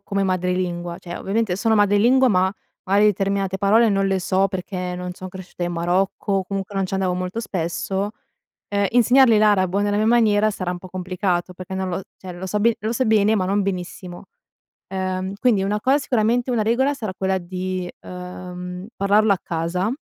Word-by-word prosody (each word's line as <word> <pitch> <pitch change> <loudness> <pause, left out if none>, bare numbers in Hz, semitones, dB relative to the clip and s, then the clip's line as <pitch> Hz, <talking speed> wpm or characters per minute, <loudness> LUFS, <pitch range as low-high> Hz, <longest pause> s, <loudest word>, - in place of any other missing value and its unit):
come 200 0 -2
madrelingua, 180 -2 -1
cioè 175 -1 -7
ovviamente 205 -1 -1
sono 220 +3 +2
madrelingua, 215 +6 +4
ma, 190 -3 +2 0.3
magari 200 +2 +4
determinate 195 -1 0
parole 220 +4 +4
non 195 -1 +1
le 195 -1 +1
so, 190 +2 +1
perché 180 -1 -4
non 180 0 -5
son 185 +1 -8
cresciuta 185 -1 -9
in 175 0 -1
Marocco, 180 +4 0
o 190 - -3
comunque 195 +1 -5
non 195 -1 0
ci 195 - -4
andavo 185 -2 0
molto 185 +4 -3
spesso. 190 +1 -2 0.6
Ehm, 200 -1 +1
insegnargli 245 0 +5
l'arabo 200 -3 +3
nella 205 0 +1
mia 215 - +2
maniera, 215 -2 +4
sarà 185 -3 -3
un 180 - -4
po' 185 - -11
complicato, 185 -1 -2
perché 185 +1 -8
non 190 0 -2
lo 180 +2 -3
cioè 185 -1 -9
lo 180 +2 -7
so 210 +2 -1
be 230 +1 +3
lo 215 +3 -2
so 255 +2 0
bene, 215 0 +4
ma 190 -3 +1
non 200 +2 +1
benissimo, 180 -1 -5 0.6
ehm, 190 0 -3
quindi 225 -6 +3
una 205 +2 -1
cosa 265 +5 +3
sicuramente 245 -2 +1
una 235 -3 +1
regola 250 +6 +2
sarà 215 -7 -5
quella 190 0 0
di, 185 0 -4
ehm, 180 +1 -8
parlarlo 200 +1 +3
a 190 - 0
casa, 170 +4 -1
195 Hz, 190 wpm, -22 LUFS, 180-210 Hz, 0.6 s, insegnargli